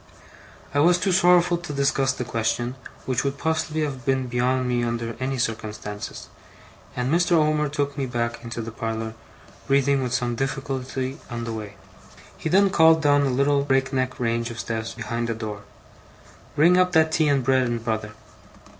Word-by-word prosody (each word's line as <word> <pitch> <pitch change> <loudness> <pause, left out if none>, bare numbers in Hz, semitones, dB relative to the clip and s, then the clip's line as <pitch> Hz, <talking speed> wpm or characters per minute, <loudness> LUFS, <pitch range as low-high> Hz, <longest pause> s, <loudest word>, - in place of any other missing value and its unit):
I 145 - +2
was 175 +4 +5
too 190 +1 0
sorrowful 175 -1 +4
to 175 -3 -7
discuss 140 -1 +1
the 125 - -4
question, 120 +1 -1 0.3
which 125 -2 0
would 140 0 -2
possibly 160 0 -1
have 135 -4 -4
been 130 0 +1
beyond 125 +1 0
me 120 -1 0
under 115 -1 -2
any 130 +1 -2
circumstances; 110 -3 -4 0.7
and 125 +4 -1
Mr. 175 +1 +3
Omer 155 -2 +3
took 145 -1 -2
me 135 - -1
back 115 -1 -3
into 115 0 -5
the 115 - -6
parlour, 110 0 -4 0.5
breathing 140 0 +3
with 125 -2 -2
some 125 -1 0
difficulty 135 +1 -3
on 120 -1 -4
the 115 -1 -4
way. 105 -2 -7 0.6
He 160 - -4
then 195 +3 +4
called 160 -1 +5
down 145 -1 +4
a - - 0
little 140 +2 +2
break 135 -1 +1
neck 130 -1 -1
range 115 -1 0
of 115 +1 -7
steps 115 0 -3
behind 115 0 -3
a 115 - -1
door: 105 -2 -6 0.9
'Bring 170 +5 +5
up 180 0 +2
that 160 -1 +4
tea 160 -1 +2
and 140 -2 +2
bread 130 0 +3
and 120 -1 -3
butter! 110 -2 -2
130 Hz, 180 wpm, -24 LUFS, 115-145 Hz, 0.9 s, was